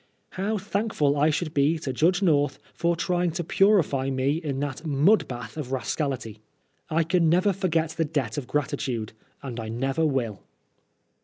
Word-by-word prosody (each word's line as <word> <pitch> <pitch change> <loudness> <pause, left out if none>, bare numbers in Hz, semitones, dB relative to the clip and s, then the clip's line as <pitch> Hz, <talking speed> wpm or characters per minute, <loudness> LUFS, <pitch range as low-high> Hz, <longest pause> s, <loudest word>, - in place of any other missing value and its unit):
How 205 +4 -1
thankful 200 -7 0
I 150 +2 +3
should 155 +1 -2
be 145 +3 +3
to 140 -4 -4
Judge 175 +8 +2
North 145 -5 +2 0.2
for 170 0 +1
trying 175 +1 0
to 175 0 -2
purify 165 -8 +3
me 135 +3 +1
in 145 -5 -3
that 145 +1 -4
mud 160 +8 +3
bath 120 +1 -7
of 140 -4 -5
rascality. 130 -3 -2 0.5
I 165 +1 +2
can 165 0 +2
never 185 +4 +3
forget 165 -4 0
the 165 - -1
debt 145 -8 -2
of 135 -4 -4
gratitude 130 -6 -2
— - - -36
and 125 -3 -5
I 110 -1 -5
never 135 +7 -1
will 125 -9 -1
150 Hz, 170 wpm, -26 LUFS, 135-170 Hz, 0.5 s, I